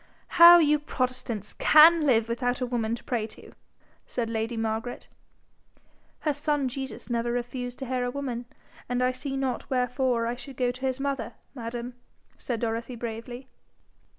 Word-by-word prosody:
'How 345 0 +9
you 300 -3 +4
protestants 255 -7 -3
CAN 310 0 +6
live 230 -4 +3
without 245 +1 -1
a 255 - -1
woman 235 -2 -1
to - - -12
pray 230 -4 -2
to!' - - -14 0.6
said 230 -2 -3
lady 225 +1 -2
Margaret. 225 +2 -3 1.1
'Her 300 - +1
son 290 -1 0
Jesus 265 -2 -6
never 235 0 -1
refused 245 +1 -4
to 270 - -5
hear 255 0 -1
a 245 - -1
woman, 250 -3 -4 0.4
and 250 0 0
I 255 - +3
see 270 +1 -5
not 265 -2 -2
wherefore 250 -2 0
I 235 - -1
should 265 +1 -10
go 250 -1 +1
to 255 +1 -13
his 260 0 -2
mother, 275 -3 -3 0.2
madam,' 240 -1 -6 0.4
said 235 -3 -4
Dorothy, 230 +2 -3
bravely. 235 +2 -6
245 Hz, 160 wpm, -27 LUFS, 235-270 Hz, 1.1 s, How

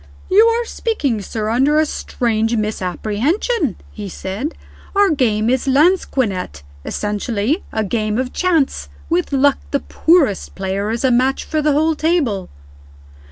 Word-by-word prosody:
"You 420 +4 +7
are 465 +1 +1
speaking, 290 - -2
sir, 215 +2 -3
under 270 +6 +3
a 310 - +3
strange 230 -5 -1
misapprehension," 220 - -1 0.2
he 205 -2 -7
said. 200 - -5 0.4
"Our 400 -2 +4
game 225 -7 +1
is 260 +2 +1
lansquenet 260 - +1 0.2
essentially 210 - -2
a 220 - -1
game 215 0 -1
of 255 0 -2
chance. 335 -7 0 0.2
With 345 -1 +1
luck, 275 0 +3
the 280 - 0
poorest 315 - +1
player 195 +2 -2
is 230 +3 -2
a 260 - +3
match 255 +3 +2
for 310 -1 -1
the 300 -1 +2
whole 315 +3 +2
table." 300 - 0
255 Hz, 140 wpm, -18 LUFS, 215-310 Hz, 0.4 s, You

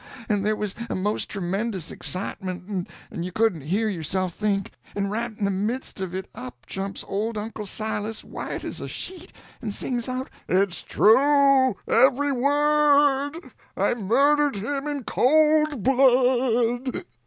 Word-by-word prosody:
and 205 -2 +1
there 215 +1 +1
was 210 -2 -3 0.2
a - - -2
most 205 +3 -1
tremendous 195 -1 -3
excitement, 185 0 -4 0.2
and 170 - -4
you 180 - -4
couldn't 215 -6 +1
hear 195 +10 0
yourself 185 -1 -2
think; 200 -1 -1 0.2
and 200 0 -1
right 230 0 -3
in 205 - -1
the 200 - +1
midst 210 +5 -3
of 185 -1 -4
it 190 0 -4
up 125 -1 -9
jumps 195 0 -5
old 215 +3 -2
Uncle 210 0 -5
Silas, 215 +1 -3
white - - -6
as - - -5
a - - -5
sheet, 365 -1 -7 0.3
and 215 -4 -4
sings 245 -1 -2
out: 255 +1 -3 0.2
"_It's 185 0 +1
true, 270 +1 +4
every 270 +4 +4
word—I 290 +2 +2
murdered 280 +6 +3
him 275 +8 -3
in 290 -3 -3
cold 305 -1 +3
blood! 250 -1 +2
225 Hz, 140 wpm, -24 LUFS, 195-270 Hz, 0.3 s, true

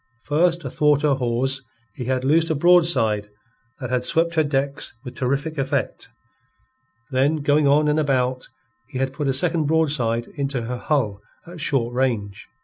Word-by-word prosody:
First 170 +3 +1
athwart 150 -1 +2
her 150 -2 +3
hawse 130 +1 0 0.3
he 125 - -6
had 130 0 -1
loosed 160 +4 +3
a 160 - +1
broadside 140 -11 +3 0.5
that 125 -3 -5
had 125 -1 0
swept 165 +4 +1
her 160 -2 +3
decks 140 -3 -2
with 125 - -8
terrific 140 +4 -2
effect, 135 -3 -2 1.0
then 135 +4 +2
going 145 0 +3
on 150 +2 +4
and 150 +1 +2
about, 130 -3 0 0.4
he 130 - -7
had 135 0 -1
put 145 +1 -3
a - - +2
second 160 +3 +1
broadside 145 -8 +1
into 140 -4 -2
her 125 +2 -4
hull 115 -8 -1 0.2
at 170 -1 -10
short 125 -6 0
range. 115 -6 -2
140 Hz, 160 wpm, -22 LUFS, 125-155 Hz, 1.0 s, on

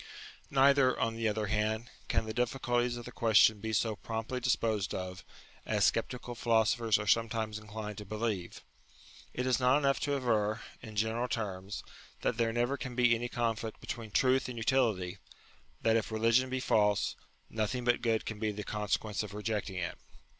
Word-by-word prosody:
Neither, 135 -1 +4
on 115 0 0
the 115 0 0
other 105 0 0
hand, 110 +3 -1 0.2
can - - +1
the 110 - -4
difficulties 120 0 0
of 120 - -8
the 125 - -8
question 110 -2 +5
be 110 +2 -3
so 110 0 +1
promptly 115 +4 -4
disposed 110 -6 0
of, 90 0 -5 0.4
as - - +2
sceptical 125 -1 -1
philosophers 115 -1 +2
are 105 - -4
sometimes 110 0 +1
inclined 105 -1 -7
to 105 - -8
believe. 105 -3 -3 0.7
It 125 - -1
is 130 0 +2
not 130 +2 +4
enough 140 -2 +2
to 145 -1 0
aver, 115 -4 +1 0.2
in 110 -2 -10
general 110 +3 0
terms, 100 -4 -4 0.4
that 115 - 0
there 115 -1 +2
never 120 +4 0
can 125 -1 -6
be 120 -1 +5
any 120 +1 -1
conflict 115 -2 -2
between 115 -2 -6
truth 130 +4 +2
and 125 - -6
utility; 110 -7 +1 0.6
that 115 0 +4
if 115 0 0
religion 115 +4 +3
be 130 0 -1
false, 105 -4 +2 0.3
nothing 110 +3 -2
but 120 0 +2
good 115 -2 +1
can 110 -2 -5
be 110 -1 0
the 105 0 -5
consequence 105 0 -1
of 105 -1 -7
rejecting 105 -2 -2
it. 90 -1 -4
115 Hz, 175 wpm, -32 LUFS, 105-120 Hz, 0.7 s, question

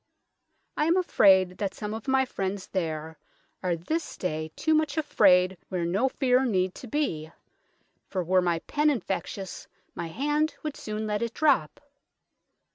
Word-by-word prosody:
I 300 - +2
am 335 +2 +3
afrayd 190 - +4
that 200 -2 -2
some 210 0 -5
of 220 +4 -7
my 265 0 +3
friends 195 -5 -3
there 160 -3 -3 0.4
are 180 -2 0
this 315 - -3
day 155 -3 -3
too 315 - +1
much 310 -2 +1
afrayd 190 - +4
where 180 -3 -1
no 200 +10 +1
feare 255 -1 +2
need 185 -7 +1
to 255 - -8
bee, 165 - -2 0.8
for 185 -2 -1
were 185 +2 +3
my 175 -2 +1
penn 300 +1 +2
infectious 195 -6 -4 0.3
my 170 - -4
hand 295 - 0
would 305 -2 -3
soone 215 0 -4
let 210 0 -1
it 235 0 -3
drop. 280 - +2
205 Hz, 155 wpm, -27 LUFS, 180-275 Hz, 0.8 s, afrayd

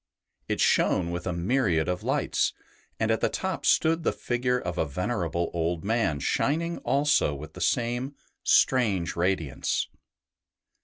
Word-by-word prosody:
It - - -2
shone 85 -2 +2
with 90 +2 -4
a - - 0
myriad 90 -2 +1
of 90 0 -1
lights, - - 0 0.5
and 110 0 +1
at 110 - 0
the - - +2
top 190 -2 -3
stood 165 +1 +3
the - - +1
figure 125 +1 -1
of 90 -7 -4
a 80 - +1
venerable 85 - -2
old 85 0 -1
man 105 -9 +1
shining 165 - 0
also 140 - +2
with 75 +3 -9
the - - -9
same 120 +3 0 0.3
strange 100 -10 +3
radiance. 85 -5 -1
95 Hz, 145 wpm, -27 LUFS, 85-125 Hz, 0.5 s, stood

